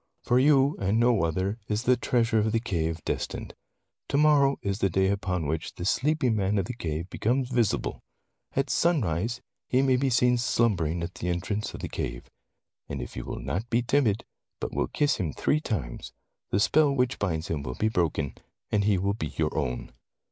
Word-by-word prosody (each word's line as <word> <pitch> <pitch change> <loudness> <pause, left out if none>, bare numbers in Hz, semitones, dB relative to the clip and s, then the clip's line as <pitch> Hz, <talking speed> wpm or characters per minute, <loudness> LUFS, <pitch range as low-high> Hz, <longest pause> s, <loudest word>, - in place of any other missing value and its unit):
For 125 +1 +3
you, 140 +1 +4
and 100 +3 +1
no 120 -5 +3
other, 95 +7 -1
is 105 +2 -1
the 125 +1 +4
treasure 120 -2 +1
of 110 +1 +1
the 115 - +2
cave 80 -7 -2
destined. - - -3 0.6
To 140 - +1
morrow 145 -2 +4
is 100 0 -1
the 95 - +2
day 95 +2 +2
upon 90 -4 -1
which 80 +2 -3
the 85 - -5
sleeping 130 +1 +2
man 100 0 +1
of 95 - +1
the 125 - -5
cave 85 -6 -4
becomes 125 +3 0
visible. 120 -4 0 0.5
At 135 0 0
sunrise 120 - +1 0.3
he 130 +1 +3
may 130 -2 +3
be 135 +1 +1
seen 125 0 +3
slumbering 90 -9 +1
at 85 +2 -5
the 90 - -4
entrance 95 +5 -2
of - - -8
the - - -3
cave. - - -5 0.6
And 70 - -4
if - - -7
you - - -5
will - - -5
not 110 +7 -3
be 120 0 +2
timid, 115 -5 +1 0.3
but - - -4
will - - 0
kiss 145 -1 +1
him 80 -5 -2
three 155 - +1
times, 95 - -4 0.4
the 100 - +1
spell 150 +7 +4
which 130 -2 0
binds 85 -5 -1
him 80 -3 -1
will 65 -3 -5
be 110 - +1
broken, 80 -8 0 0.4
and 100 -1 +2
he 105 -2 +3
will 100 +2 0
be 80 -7 -3
your 80 -1 0
own. 65 -5 -2
105 Hz, 200 wpm, -27 LUFS, 85-125 Hz, 0.6 s, you